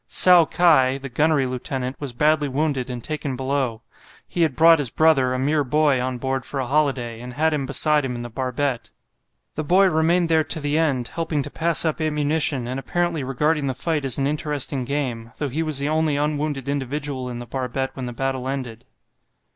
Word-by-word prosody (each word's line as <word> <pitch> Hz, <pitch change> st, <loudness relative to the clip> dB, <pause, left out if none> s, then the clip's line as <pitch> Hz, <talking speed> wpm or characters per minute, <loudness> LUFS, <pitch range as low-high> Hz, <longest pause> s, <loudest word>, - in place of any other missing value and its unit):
Tsao 180 Hz, -2 st, +6 dB
kai, 135 Hz, -6 st, +3 dB
the 135 Hz, 0 st, -8 dB
gunnery 150 Hz, +2 st, +2 dB
lieutenant, 130 Hz, +1 st, -4 dB
was 140 Hz, -3 st, -5 dB
badly 150 Hz, +4 st, +2 dB
wounded 135 Hz, -2 st, -1 dB
and 120 Hz, -2 st, -6 dB
taken 150 Hz, -3 st, -3 dB
below. 130 Hz, -3 st, -2 dB, 0.4 s
He 175 Hz, -, -3 dB
had 155 Hz, -6 st, +2 dB
brought 165 Hz, +2 st, +6 dB
his 140 Hz, -5 st, -1 dB
brother, 140 Hz, -3 st, +3 dB
a 130 Hz, -, -1 dB
mere 145 Hz, +3 st, +1 dB
boy, 145 Hz, -1 st, +2 dB
on 130 Hz, 0 st, -2 dB
board 130 Hz, +1 st, -2 dB
for 135 Hz, +2 st, -5 dB
a 130 Hz, -, -1 dB
holiday, 130 Hz, -4 st, 0 dB
and 125 Hz, 0 st, -8 dB
had 155 Hz, +4 st, +1 dB
him 140 Hz, -3 st, -2 dB
beside 150 Hz, +2 st, +2 dB
him 125 Hz, -2 st, -3 dB
in 120 Hz, -, -5 dB
the -, -, -5 dB
barbette. 130 Hz, +1 st, -2 dB, 0.6 s
The 155 Hz, -, -3 dB
boy 185 Hz, +6 st, +4 dB
remained 165 Hz, +2 st, +2 dB
there 160 Hz, -1 st, +3 dB
to 160 Hz, -, -1 dB
the 145 Hz, 0 st, -1 dB
end, 135 Hz, -7 st, +1 dB
helping 160 Hz, -2 st, -2 dB
to -, -, -6 dB
pass 170 Hz, 0 st, +2 dB
up 160 Hz, 0 st, -1 dB
ammunition, 150 Hz, -4 st, 0 dB
and 130 Hz, +2 st, -3 dB
apparently 175 Hz, 0 st, -1 dB
regarding 145 Hz, +3 st, 0 dB
the 130 Hz, -, -2 dB
fight 155 Hz, +2 st, -1 dB
as 135 Hz, -2 st, -1 dB
an 135 Hz, -, 0 dB
interesting 145 Hz, -3 st, -1 dB
game, 120 Hz, -4 st, -3 dB
though 145 Hz, -, -2 dB
he 150 Hz, +6 st, -2 dB
was 155 Hz, -3 st, -2 dB
the 140 Hz, +1 st, -1 dB
only 155 Hz, -1 st, +1 dB
unwounded 145 Hz, -2 st, -2 dB
individual 140 Hz, -1 st, -3 dB
in 120 Hz, -, -6 dB
the 120 Hz, -, -7 dB
barbette 130 Hz, +2 st, -3 dB
when 130 Hz, -2 st, -5 dB
the -, -, -5 dB
battle 130 Hz, +1 st, -3 dB
ended. 130 Hz, -4 st, -5 dB
140 Hz, 205 wpm, -22 LUFS, 130-155 Hz, 0.6 s, Tsao